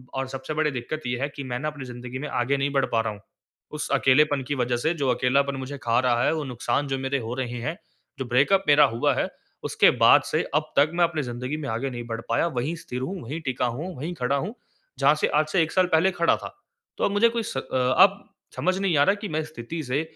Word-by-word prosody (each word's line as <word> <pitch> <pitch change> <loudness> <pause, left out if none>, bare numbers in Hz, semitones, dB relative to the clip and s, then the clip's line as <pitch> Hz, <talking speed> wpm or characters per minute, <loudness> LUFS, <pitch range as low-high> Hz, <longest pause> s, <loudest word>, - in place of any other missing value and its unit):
और 135 0 -2
सबसे 135 +3 -6
बड़ी 155 -1 +1
दिक्कत 135 +5 -5
ये 120 0 -2
है 140 - 0
कि 140 - -5
मैं 125 -1 -4
ना 155 - -3
अपनी 145 -3 -6
ज़िंदगी 125 +1 -7
में 150 - -4
आगे 130 +3 0
नहीं 140 +1 0
बढ़ 135 -1 +2
पा 115 -1 +2
रहा 110 -1 -3
हूँ। 100 - -14 0.5
उस 150 -1 -4
अकेलेपन 140 +3 +4
की 145 +3 -3
वज़ह 125 -1 0
से 160 +7 0
जो 140 -5 -1
अकेलापन 135 +3 +2
मुझे 135 +2 -6
खा 115 0 +2
रहा 125 -1 +2
है, - - +2
वो 155 -2 -2
नुकसान 130 +2 -2
जो 135 0 -1
मेरे 135 +1 -1
हो 115 +1 -5
रहे 120 -2 -4
हैं, 160 +7 -3 0.4
जो 130 - -2
ब्रेकअप 140 +11 +3
मेरा 145 0 +7
हुआ 145 +3 +2
है, - - 0 0.3
उसके - - +4
बाद - - +8
से - - +1
अब 155 0 0
तक 145 +3 +5
मैं 175 0 +2
अपनी 160 -2 -2
ज़िंदगी 125 +4 -4
में 145 -3 -5
आगे 120 +5 -2
नहीं 120 -1 -6
बढ़ 115 0 -4
पाया 115 +8 +2
वहीं 145 +8 -1
स्थिर 125 +1 -5
हूँ, 180 +5 -4
वहीं 150 +8 -5
टिका 130 -3 -1
हूँ, 155 +10 -4
वहीं 160 +6 -4
खड़ा 125 +1 0
हूँ, 190 - -3 0.5
जहाँ 145 +2 +5
से - - +1
आज 155 +1 +1
से 180 - +2
1 160 - -4
साल 185 -1 +3
पहले 185 +4 +4
खड़ा 170 -2 +2
था। - - -9 0.4
तो - - -2
अब - - 0
मुझे 220 +3 +4
कोई 230 -1 -2
स 135 - -5
अ, - - 0 0.4
अब 200 +1 +5 0.3
समझ 185 +1 0
नहीं 185 -6 +1
आ 140 - +6
रहा 195 +5 +3
कि 205 0 -6
मैं 155 0 -1
स्थिति 155 +1 -6
से, 135 +4 -1
140 Hz, 260 wpm, -25 LUFS, 125-155 Hz, 0.5 s, बाद